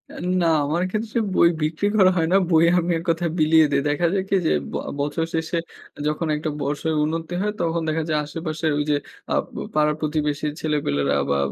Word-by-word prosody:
N 180 Hz, -, -5 dB, 0.2 s
না, -, -, +3 dB, 0.2 s
আমার 165 Hz, +5 st, 0 dB
ক্ষেত্রে 220 Hz, +1 st, -2 dB, 0.2 s
বই 170 Hz, -, +6 dB
বিক্রি 155 Hz, +6 st, 0 dB
করা 185 Hz, -2 st, +6 dB
হয় 160 Hz, -1 st, +2 dB
না, -, -, +7 dB
বই 165 Hz, +1 st, +5 dB
আমি 175 Hz, +1 st, -1 dB
এক -, -, -8 dB
কথায় 165 Hz, 0 st, 0 dB
বিলিয়ে 155 Hz, 0 st, +5 dB
দেই। 140 Hz, 0 st, +2 dB
দেখা 170 Hz, +4 st, +1 dB
যায় 190 Hz, -1 st, +1 dB
কি 195 Hz, -, +2 dB
যে, -, -, +3 dB, 0.2 s
ব -, -, -3 dB, 0.3 s
বছর 150 Hz, +3 st, -1 dB
শেষে 160 Hz, +1 st, -1 dB, 0.5 s
যখন 155 Hz, +2 st, -1 dB
একটা 155 Hz, +1 st, -3 dB
বর্ষের 150 Hz, +3 st, -1 dB
উন্নতি 165 Hz, +2 st, -3 dB
হয়, 210 Hz, 0 st, -1 dB
তখন 165 Hz, 0 st, 0 dB
দেখা 160 Hz, +1 st, 0 dB
যায় 155 Hz, -1 st, +1 dB
আশেপাশের 155 Hz, 0 st, -3 dB
ওই -, -, +1 dB
যে 145 Hz, -, +3 dB, 0.4 s
আ -, -, +2 dB, 0.2 s
প -, -, -14 dB, 0.2 s
পাড়ার 150 Hz, 0 st, +3 dB
প্রতিবেশী 150 Hz, -1 st, -1 dB
ছেলেপেলেরা 70 Hz, -, 0 dB
বা 70 Hz, -, +2 dB
160 Hz, 205 wpm, -23 LUFS, 150-170 Hz, 0.5 s, না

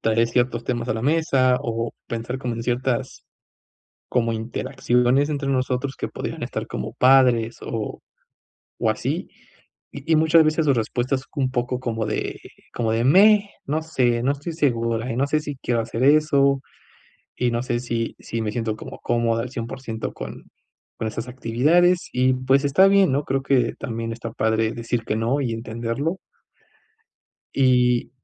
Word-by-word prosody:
traer 115 Hz, +1 st, +2 dB
ciertos 120 Hz, -1 st, 0 dB
temas 120 Hz, -1 st, -2 dB
a -, -, +1 dB
la 110 Hz, -, -4 dB
mesa, 135 Hz, -4 st, +2 dB
o 115 Hz, 0 st, -2 dB, 0.2 s
pensar 120 Hz, +3 st, -4 dB
como 125 Hz, -3 st, -3 dB
en 115 Hz, -, -5 dB
ciertas 125 Hz, +1 st, -2 dB, 0.9 s
como 115 Hz, -2 st, +1 dB
interacciones 125 Hz, +4 st, +1 dB
entre 140 Hz, -2 st, -2 dB
nosotros 130 Hz, +1 st, -1 dB
que -, -, -4 dB
podrían -, -, -5 dB
estar -, -, -4 dB
como -, -, -5 dB
padres, 125 Hz, -3 st, +4 dB
o, 110 Hz, -3 st, -5 dB, 0.8 s
o -, -, +2 dB
así, -, -, -2 dB, 0.6 s
y 145 Hz, +3 st, -6 dB
y -, -, +6 dB
muchas 160 Hz, +1 st, +5 dB
veces 155 Hz, +1 st, +1 dB
su 140 Hz, -, +4 dB
respuesta 120 Hz, +3 st, -1 dB
es 130 Hz, -, -5 dB
un 130 Hz, -2 st, 0 dB
poco 125 Hz, 0 st, -1 dB
como 115 Hz, -3 st, -2 dB
de 110 Hz, -, -3 dB, 0.3 s
como 115 Hz, -2 st, -1 dB
de: 115 Hz, +1 st, +1 dB
"Meh, 200 Hz, +7 st, +6 dB, 0.2 s
no 155 Hz, +3 st, -1 dB
sé, 125 Hz, -6 st, 0 dB
no 135 Hz, -, +3 dB
estoy 145 Hz, +4 st, -5 dB
segura, 115 Hz, -5 st, 0 dB
y -, -, -3 dB
no 140 Hz, +2 st, +1 dB
sé 155 Hz, +2 st, +1 dB
si 145 Hz, -2 st, -5 dB
quiero 120 Hz, -3 st, 0 dB
hacer 115 Hz, +2 st, -3 dB
eso, 140 Hz, -2 st, +4 dB, 0.7 s
y 125 Hz, -1 st, 0 dB
no 120 Hz, 0 st, -1 dB
sé 120 Hz, -1 st, -1 dB
si 115 Hz, -2 st, -3 dB
si 115 Hz, 0 st, -4 dB
me 105 Hz, -1 st, -2 dB
siento 110 Hz, -2 st, -2 dB
como -, -, -9 dB
cómoda 115 Hz, -1 st, 0 dB
al 125 Hz, -, -6 dB
cien 115 Hz, -3 st, -4 dB
por 130 Hz, -, -7 dB
ciento 110 Hz, -3 st, -4 dB
con -, -, -8 dB, 0.5 s
con 110 Hz, -, -2 dB
esas 115 Hz, +3 st, -5 dB
actividades". 150 Hz, +9 st, +2 dB
Y 130 Hz, +1 st, +2 dB
pues 135 Hz, +2 st, +2 dB
está 185 Hz, +8 st, +5 dB
bien, 195 Hz, -6 st, +4 dB
¿no? 140 Hz, +2 st, +1 dB
Creo 135 Hz, 0 st, -1 dB
que 135 Hz, -2 st, +2 dB
también 115 Hz, -3 st, -4 dB
está 115 Hz, 0 st, -6 dB
padre 110 Hz, 0 st, +1 dB
decir 115 Hz, 0 st, -3 dB
que 105 Hz, -, -1 dB
no, 115 Hz, +6 st, 0 dB
y 120 Hz, -4 st, -1 dB
entenderlo. 115 Hz, +9 st, -3 dB, 1.4 s
Y 125 Hz, -2 st, +3 dB
125 Hz, 175 wpm, -23 LUFS, 115-140 Hz, 1.4 s, y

